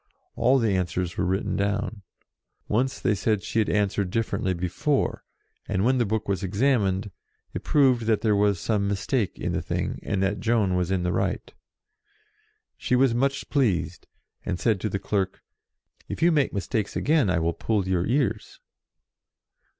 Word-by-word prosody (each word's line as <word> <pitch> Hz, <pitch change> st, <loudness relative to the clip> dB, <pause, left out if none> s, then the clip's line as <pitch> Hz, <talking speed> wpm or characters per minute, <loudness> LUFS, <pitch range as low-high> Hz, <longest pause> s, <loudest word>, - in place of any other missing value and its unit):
All 130 Hz, +2 st, +4 dB
the 110 Hz, -6 st, +1 dB
answers 90 Hz, -1 st, -2 dB
were -, -, 0 dB
written 95 Hz, +2 st, -1 dB
down. 100 Hz, +2 st, -1 dB, 0.7 s
Once 125 Hz, +5 st, 0 dB
they -, -, +1 dB
said 105 Hz, +1 st, 0 dB
she 115 Hz, -, -1 dB
had 110 Hz, -, +1 dB
answered 100 Hz, -2 st, 0 dB
differently 95 Hz, -3 st, -1 dB
before, 90 Hz, -, -1 dB, 0.4 s
and, 95 Hz, +3 st, 0 dB
when 130 Hz, +1 st, +3 dB
the 120 Hz, -, +1 dB
book 110 Hz, +1 st, -2 dB
was 95 Hz, -2 st, -1 dB
examined, 100 Hz, -1 st, +1 dB, 0.4 s
it -, -, -5 dB
proved 130 Hz, -6 st, +3 dB
that 110 Hz, -2 st, +2 dB
there 110 Hz, -2 st, +2 dB
was 100 Hz, -2 st, +2 dB
some 100 Hz, -1 st, 0 dB
mistake 100 Hz, +2 st, -1 dB
in -, -, -2 dB
the -, -, -1 dB
thing, -, -, -3 dB
and 95 Hz, -1 st, -1 dB
that 100 Hz, +1 st, 0 dB
Joan 110 Hz, -5 st, +1 dB
was 90 Hz, -1 st, 0 dB
in 95 Hz, -2 st, 0 dB
the 90 Hz, -, 0 dB
right. -, -, -2 dB, 1.2 s
She 125 Hz, -, 0 dB
was 130 Hz, -1 st, +4 dB
much 135 Hz, +3 st, 0 dB
pleased, 90 Hz, -, 0 dB, 0.4 s
and 90 Hz, -, -3 dB
said 110 Hz, -6 st, +1 dB
to 110 Hz, -, -1 dB
the 100 Hz, -, -2 dB
clerk, 95 Hz, -1 st, -2 dB, 0.3 s
" -, -, -36 dB
If -, -, -3 dB
you 175 Hz, -, +5 dB
make 145 Hz, -4 st, +2 dB
mistakes 100 Hz, +2 st, -2 dB
again, 145 Hz, -8 st, +2 dB
I 90 Hz, -, +2 dB
will 85 Hz, +1 st, 0 dB
pull 100 Hz, +1 st, -1 dB
your 90 Hz, -1 st, 0 dB
ears." 135 Hz, +3 st, -1 dB
105 Hz, 175 wpm, -25 LUFS, 95-120 Hz, 1.2 s, you